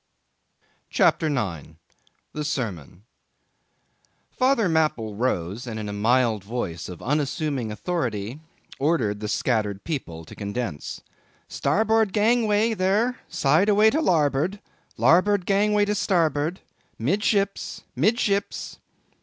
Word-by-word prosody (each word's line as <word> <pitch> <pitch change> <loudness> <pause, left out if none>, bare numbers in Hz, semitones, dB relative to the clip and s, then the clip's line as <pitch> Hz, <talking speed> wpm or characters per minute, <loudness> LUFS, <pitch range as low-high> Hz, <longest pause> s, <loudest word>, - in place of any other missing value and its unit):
CHAPTER 160 - +3
9. 85 - -3 0.6
The 150 - -3
Sermon. 105 - -4 1.3
Father 255 -5 +2
Mapple 155 -10 0
rose, 110 -1 -2
and 110 -2 -4
in 105 - -5
a 105 - -4
mild 110 0 +2
voice 100 -7 -4
of 90 - -9
unassuming 140 -3 -1
authority 120 - -3 0.4
ordered 135 -9 +1
the 105 - -4
scattered 105 -3 -1
people 85 - -5
to - - -12
condense. 100 -5 -5 0.5
"Starboard 220 -2 +1
gangway, 220 0 +3
there! 215 +5 +1
side 155 +9 +2
away 210 +1 +5
to 315 - +1
larboard—larboard 180 - +1
gangway 205 +1 +3
to 205 - 0
starboard! 165 -4 0 0.4
Midships! 200 - 0
midships!" 200 - 0
150 Hz, 105 wpm, -24 LUFS, -, 1.3 s, away